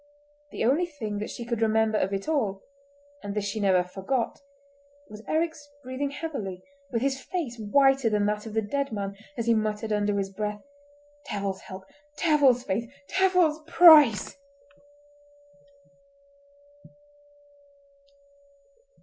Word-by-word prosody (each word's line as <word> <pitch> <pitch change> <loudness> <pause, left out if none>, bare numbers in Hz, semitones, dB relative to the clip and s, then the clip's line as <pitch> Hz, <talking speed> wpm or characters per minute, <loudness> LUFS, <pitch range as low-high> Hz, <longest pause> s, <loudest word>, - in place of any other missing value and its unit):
The - - -3
only 300 +9 +2
thing 220 -10 -5
that 210 - -4
she 235 - -7
could 235 -2 -3
remember 220 -1 +2
of 190 - -1
it 195 +4 -3
all—and 280 -1 -5
this 210 -1 -1
she 205 +2 -3
never 190 -3 +3
forgot—was 280 +5 -7
Eric's 315 -2 -2
breathing 260 +2 -3
heavily, 225 - -6 0.3
with 235 -1 -2
his 270 -1 -1
face 260 -7 -4
whiter 270 +3 +3
than 210 -1 +1
that 210 +1 -2
of 220 - -8
the 220 - +1
dead 280 +6 -2
man, 200 -2 -4 0.2
as 230 - -2
he 235 - +4
muttered 215 0 -1
under 205 -1 0
his 195 -1 -2
breath: 210 +1 -4 0.7
"Devil's 200 -2 -3
help! 190 0 -10 0.3
Devil's 285 -7 +3
faith! 230 +3 -3 0.2
Devil's 365 -5 +3
price!" 300 - +6
235 Hz, 125 wpm, -26 LUFS, 210-285 Hz, 0.7 s, price